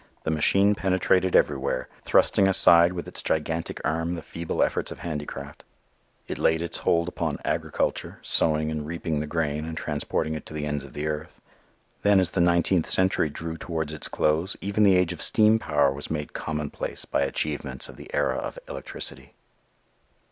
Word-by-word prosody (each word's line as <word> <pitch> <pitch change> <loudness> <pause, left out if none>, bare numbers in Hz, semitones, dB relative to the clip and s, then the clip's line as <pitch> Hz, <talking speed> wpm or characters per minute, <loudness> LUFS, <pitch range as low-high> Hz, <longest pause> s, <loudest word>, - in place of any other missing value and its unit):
The 80 - -1
machine 100 +6 +4
penetrated 95 -1 +2
everywhere, 65 - +1 0.2
thrusting 95 - +4
aside 85 -2 +6
with 85 - -5
its - - -5
gigantic 80 +1 -2
arm 80 +2 0
the 85 - -7
feeble 85 -1 -2
efforts - - -1
of - - -8
handicraft. 75 -3 -6 0.6
It - - -4
laid 80 +1 +2
its 85 - -3
hold 85 0 +2
upon 80 -4 -2
agriculture, - - -1
sowing 75 -1 +2
and 75 -1 -3
reaping 80 -2 -2
the 75 - -3
grain 75 -1 -1
and 80 0 -6
transporting 80 +1 -2
it 80 - -5
to 75 - -9
the 75 -1 -3
ends 75 -2 -2
of 70 - -12
the 75 - -4
earth. 75 0 -4 0.6
Then 100 -1 +5
as 90 -2 +1
the 90 - +1
nineteenth 85 0 +2
century 95 -4 +2
drew 80 +2 -6
towards 80 -2 -3
its 80 - -4
close, 80 +5 0
even 100 +2 -1
the 100 -2 +6
age 90 -1 +2
of - - -9
steam 110 0 +4
power 70 -8 +2
was 70 +1 -7
made 75 -2 -4
commonplace 75 -2 -3
by - - 0
achievements 70 -2 -2
of - - -11
the - - -12
era - - +1
of - - -5
electricity. - - -7
80 Hz, 175 wpm, -26 LUFS, 75-90 Hz, 0.6 s, aside